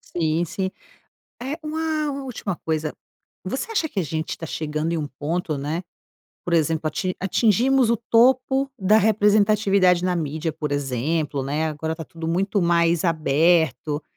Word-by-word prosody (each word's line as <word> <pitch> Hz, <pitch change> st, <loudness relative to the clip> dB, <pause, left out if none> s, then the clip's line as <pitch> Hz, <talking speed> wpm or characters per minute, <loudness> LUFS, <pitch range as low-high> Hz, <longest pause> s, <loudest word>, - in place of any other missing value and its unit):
Sim, 165 Hz, -1 st, +1 dB
sim. 190 Hz, +3 st, -3 dB, 0.7 s
Eh 275 Hz, +5 st, -4 dB
uma 310 Hz, -1 st, -2 dB
última 235 Hz, -7 st, -4 dB
coisa, 155 Hz, -1 st, -1 dB, 0.5 s
você 265 Hz, -, -3 dB
acha 330 Hz, -7 st, 0 dB
que 215 Hz, -, -5 dB
a -, -, +2 dB
gente 160 Hz, +1 st, -3 dB
tá 165 Hz, -, -6 dB
chegando 155 Hz, +1 st, -2 dB
em 170 Hz, -, 0 dB
um 150 Hz, -2 st, -3 dB
ponto, 155 Hz, 0 st, -2 dB
né, 150 Hz, +5 st, -3 dB, 0.6 s
por 175 Hz, -, -2 dB
exemplo 160 Hz, -1 st, +1 dB
ati 185 Hz, +4 st, -2 dB
atingimos 230 Hz, +6 st, +3 dB
o 235 Hz, -, +4 dB
topo 255 Hz, +4 st, +3 dB
da 210 Hz, +1 st, +4 dB
representatividade 205 Hz, -3 st, +3 dB
na 180 Hz, -1 st, +1 dB
mídia 160 Hz, +1 st, -2 dB
por 150 Hz, -1 st, -5 dB
exemplo, 145 Hz, +2 st, -1 dB
né, 150 Hz, +4 st, -1 dB
agora 160 Hz, +1 st, -3 dB
tá 165 Hz, -, -7 dB
tudo 160 Hz, +1 st, -7 dB
muito 190 Hz, +4 st, 0 dB
mais 170 Hz, 0 st, +2 dB
aberto, 160 Hz, -1 st, +2 dB
170 Hz, 150 wpm, -23 LUFS, 155-215 Hz, 0.7 s, o